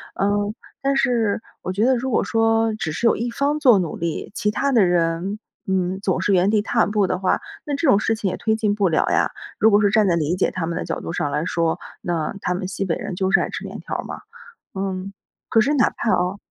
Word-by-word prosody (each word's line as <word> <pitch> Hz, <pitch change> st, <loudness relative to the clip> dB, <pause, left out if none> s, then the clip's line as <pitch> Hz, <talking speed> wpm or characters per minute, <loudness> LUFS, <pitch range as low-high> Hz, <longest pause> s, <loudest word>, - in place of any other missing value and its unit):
嗯， 205 Hz, +1 st, 0 dB, 0.3 s
但 275 Hz, 0 st, +1 dB
是 230 Hz, -5 st, +1 dB, 0.2 s
我 -, -, -3 dB
觉 200 Hz, +4 st, +1 dB
得 260 Hz, +1 st, +4 dB
如 255 Hz, +2 st, -2 dB
果 235 Hz, -, +2 dB
说 225 Hz, 0 st, +2 dB
只 215 Hz, -7 st, -3 dB
是 195 Hz, -, -3 dB
有 230 Hz, -, +5 dB
一 240 Hz, +1 st, -2 dB
方 285 Hz, +5 st, 0 dB
做 250 Hz, -7 st, +6 dB
努 175 Hz, -5 st, -2 dB
力， 170 Hz, +2 st, -4 dB
其 210 Hz, -, 0 dB
他 275 Hz, +6 st, 0 dB
的 230 Hz, -7 st, +5 dB
人， 175 Hz, +3 st, 0 dB, 0.3 s
嗯， 190 Hz, 0 st, 0 dB
总 190 Hz, -3 st, 0 dB
是 205 Hz, -, +1 dB
原 185 Hz, +1 st, +4 dB
地 210 Hz, 0 st, +3 dB
踏 225 Hz, +1 st, +2 dB
步 205 Hz, -1 st, +1 dB
的 180 Hz, -, -1 dB
话， 190 Hz, -, +1 dB, 0.2 s
那 290 Hz, -, -2 dB
这 315 Hz, +3 st, 0 dB
种 200 Hz, -, +5 dB
事 225 Hz, +1 st, 0 dB
情 210 Hz, -3 st, -2 dB
也 -, -, -4 dB
推 220 Hz, -1 st, +1 dB
进 215 Hz, -2 st, +1 dB
不 205 Hz, -2 st, +1 dB
了 160 Hz, -, +2 dB
呀。 -, -, +2 dB, 0.3 s
如 220 Hz, -, +6 dB
果 205 Hz, -1 st, +4 dB
是 205 Hz, -, +4 dB
站 215 Hz, -1 st, +4 dB
在 175 Hz, -, +3 dB
理 165 Hz, +1 st, 0 dB
解 185 Hz, -, +1 dB
他 185 Hz, -, -3 dB
们 165 Hz, +1 st, -3 dB
的 -, -, -3 dB
角 -, -, -3 dB
度 -, -, -5 dB
上 145 Hz, -, -1 dB
来 150 Hz, +3 st, -1 dB
说， 165 Hz, -1 st, 0 dB, 0.2 s
那 165 Hz, -2 st, -2 dB
他 180 Hz, -, 0 dB
们 185 Hz, +1 st, -3 dB
西 195 Hz, +1 st, -3 dB
北 170 Hz, -, 0 dB
人 185 Hz, -, -5 dB
就 190 Hz, +1 st, 0 dB
是 -, -, +5 dB
爱 -, -, -2 dB
吃 -, -, -6 dB
面 -, -, -7 dB
条 -, -, -5 dB
儿 -, -, -4 dB
嘛。 -, -, -7 dB, 0.5 s
嗯， 190 Hz, 0 st, -4 dB, 0.4 s
可 225 Hz, -, +4 dB
是 275 Hz, +7 st, +2 dB
哪 255 Hz, -5 st, +3 dB
怕 230 Hz, -, -2 dB
啊， 180 Hz, +2 st, +1 dB
200 Hz, 275 characters per minute, -22 LUFS, 180-225 Hz, 0.5 s, 做